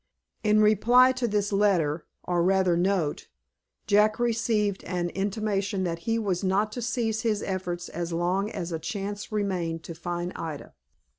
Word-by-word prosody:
In 215 0 +4
reply 240 +5 +5
to 255 -2 -1
this 205 -1 0
letter, 175 -7 +2 0.2
or 175 -1 0
rather 185 -1 +3
note, 175 -4 0 0.6
Jack 210 +1 +4
received 225 -4 0
an 175 -2 -2
intimation 200 0 -1
that 170 -2 -2
he 225 - +2
was 195 -5 -1
not 200 +3 +1
to 245 - -5
cease 230 -2 -1
his 215 -3 0
efforts 180 -2 -3
as 170 +1 -4
long 180 +4 0
as 175 -5 -5
a 165 - -2
chance 205 +5 -5
remained 180 -6 -2
to 170 - -7
find 175 +2 -4
Ida. 160 -3 -6
195 Hz, 155 wpm, -27 LUFS, 175-215 Hz, 0.6 s, reply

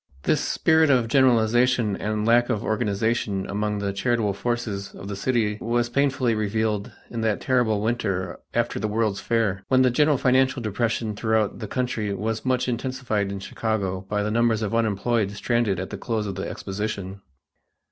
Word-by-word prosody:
This - - +2
spirit 160 -1 +3
of 125 -4 +3
generalization 120 -3 +3
and 105 +1 -2
lack 120 +2 +4
of 110 -5 -1
organization 105 -2 0
among 105 +1 -1
the 100 -1 -2
charitable 105 0 0
forces 110 -2 -3
of 95 - -9
the 100 - -4
city 105 0 0
was 120 +1 0
painfully 130 -3 +2
revealed 110 -1 -1 0.2
in 115 - -3
that 110 -2 +1
terrible 120 -5 +1
winter 100 -5 -2
after - - -1
the 105 - -1
World's 105 -1 0
Fair, 105 -5 0
when 130 0 +4
the 130 - +4
general 145 +3 +3
financial 130 +1 +2
depression 110 0 -1
throughout 110 -1 0
the 110 - -5
country 115 -5 -2
was 110 +3 -2
much 130 -1 +1
intensified 120 -5 -2
in 100 - -4
Chicago 95 -2 -2
by 105 0 0
the 105 - -1
numbers 115 -1 +2
of 105 - -2
unemployed 110 -1 +1
stranded 105 -2 0
at 95 - -5
the - - -6
close 110 -3 -2
of 100 - -3
the 95 +1 -4
exposition. 100 -1 -5
110 Hz, 170 wpm, -24 LUFS, 100-120 Hz, 0.2 s, lack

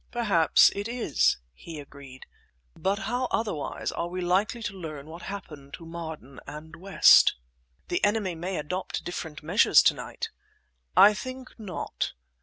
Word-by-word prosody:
"Perhaps 200 -10 +4
it 200 +2 -4
is," 225 - +1 0.2
he 155 - -9
agreed; 140 -2 -12 0.5
"but 195 +1 0
how 250 +2 -1
otherwise 180 -11 -2
are 170 - -3
we 180 +1 -5
likely 195 +6 0
to 205 - -3
learn 155 -6 -7
what 165 +3 -10
happened 150 -8 -8
to 165 - -13
Marden 160 -5 -8
and 160 +2 -9
West?" 190 +3 +6 0.5
"The 175 - -2
enemy 205 -3 +1
may 175 +3 -4
adopt 180 +5 -4
different 160 -4 -6
measures 180 +8 +5
to - - +5
night." 455 - -6 0.7
"I 200 +3 +9
think 255 +3 -7
not. 205 -4 -4
175 Hz, 145 wpm, -27 LUFS, 155-205 Hz, 0.7 s, I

